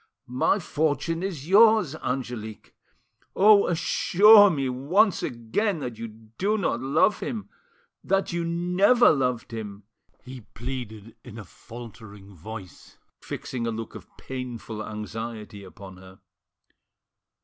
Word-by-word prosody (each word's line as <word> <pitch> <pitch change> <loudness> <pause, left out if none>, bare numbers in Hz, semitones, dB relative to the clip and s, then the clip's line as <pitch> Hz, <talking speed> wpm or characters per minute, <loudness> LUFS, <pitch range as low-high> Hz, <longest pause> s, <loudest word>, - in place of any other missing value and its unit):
"My 125 +10 +1
fortune 160 -1 -1
is 170 -7 -5
yours, 215 -4 +5
Angelique! 120 -6 -5 0.6
Oh! 205 +1 +6
assure 205 +4 +5
me 140 -6 -1
once 165 - +1
again 145 - -2
that 120 -4 -6
you 115 - -5
do 115 - -3
not 165 - -1
love 145 +10 +2
him—that 210 - -5
you 170 0 -1
never 180 +8 +3
loved 125 -5 -1
him!" 105 -2 -7 0.4
he 130 -1 -10
pleaded 115 -3 -7
in 110 - -11
a 105 - -9
faltering 110 -2 -12
voice, 95 +2 -11 0.2
fixing 120 -3 -5
a - - -1
look 115 0 -6
of - - -11
painful 120 -4 -7
anxiety 105 -1 -7
upon 95 0 -12
her. 95 +1 -15
125 Hz, 115 wpm, -25 LUFS, 110-180 Hz, 0.6 s, Oh